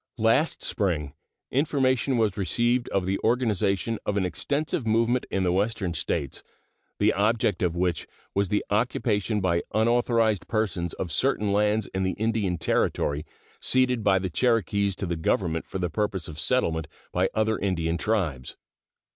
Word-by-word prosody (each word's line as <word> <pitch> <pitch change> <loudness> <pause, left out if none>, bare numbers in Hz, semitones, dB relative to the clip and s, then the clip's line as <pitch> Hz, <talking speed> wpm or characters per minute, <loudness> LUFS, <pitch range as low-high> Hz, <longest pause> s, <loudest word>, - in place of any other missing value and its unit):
Last 115 +8 +2
spring 80 -9 -1 0.4
information 135 -2 +1
was 110 -4 +1
received 120 +6 +1
of 95 -2 0
the 95 +1 -1
organization 110 -3 +1
of 105 - -1
an 95 - +1
extensive 140 - -2
movement 115 +3 +2
in 95 - 0
the 90 - +2
Western 100 -1 0
States, 70 -4 -2 0.6
the - - +3
object 105 -2 +1
of 90 -2 +1
which 90 -1 -1 0.3
was 100 0 +1
the 105 - 0
occupation 105 -1 0
by 85 -2 +1
unauthorized 115 -2 +2
persons 95 -6 -1
of 90 - -4
certain 105 - +1
lands 105 +1 +2
in 95 - -1
the 95 0 0
Indian 105 -4 0
Territory 75 -1 0 0.3
ceded 125 -3 +2
by 100 -2 +4
the 95 -1 -2
Cherokees 100 -3 +1
to 100 - -4
the 85 -1 -2
Government 80 0 -1
for - - -5
the 90 -1 -1
purpose 100 -1 -2
of 75 -1 -8
settlement 80 - 0 0.2
by 90 +2 +1
other 110 0 +1
Indian 85 -4 -1
tribes. 85 - -1
100 Hz, 155 wpm, -26 LUFS, 90-115 Hz, 0.6 s, by